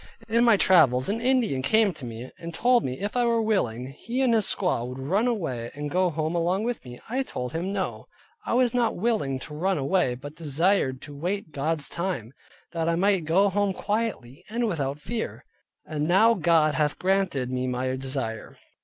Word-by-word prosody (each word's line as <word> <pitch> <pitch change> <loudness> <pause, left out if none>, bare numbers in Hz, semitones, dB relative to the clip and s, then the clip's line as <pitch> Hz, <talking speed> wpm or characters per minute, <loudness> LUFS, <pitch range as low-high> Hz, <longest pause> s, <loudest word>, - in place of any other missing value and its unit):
In 230 +1 +3
my 230 -3 +6
travels 145 -10 +4
an 225 +3 -1
Indian 245 - +2
came 210 +8 +3
to 145 -5 -9
me 115 +2 -7
and 170 -1 -7
told 245 +3 +3
me, 130 0 -4
if 205 +3 -4
I 245 - +3
were 235 -1 +2
willing, 125 - 0
he 235 - -4
and 245 -3 +3
his 220 -3 +3
squaw 180 -11 0
would 125 +1 -7
run 190 - 0
away, 135 - -2
and 145 0 -5
go 185 0 +2
home 160 0 -2
along 175 +4 +1
with 240 +1 -3
me. 125 -1 -10
I 255 +4 -1
told 125 - -5
him 175 +4 -2
no: 195 -2 -3 0.4
I - - -1
was 250 -2 +3
not 240 -2 +1
willing 200 - 0
to 150 - -8
run 185 +5 0
away, 140 -2 +1
but 145 +4 -9
desired 155 -3 0
to 145 -2 -9
wait 180 +3 -3
God's 150 +1 0
time, 170 - -3 0.4
that 165 0 -1
I 170 - +2
might 190 -1 +2
go 185 +6 +4
home 200 0 +1
quietly, 205 - -3
and 235 +2 0
without 145 -7 -2
fear. 225 +8 -5 0.4
And 150 -1 -2
now 215 +7 +5
God 165 -5 +3
hath 150 -1 0
granted 185 -9 0
me 130 0 -1
my 130 +1 -1
desire. 130 -4 -5
170 Hz, 195 wpm, -26 LUFS, 135-210 Hz, 0.4 s, my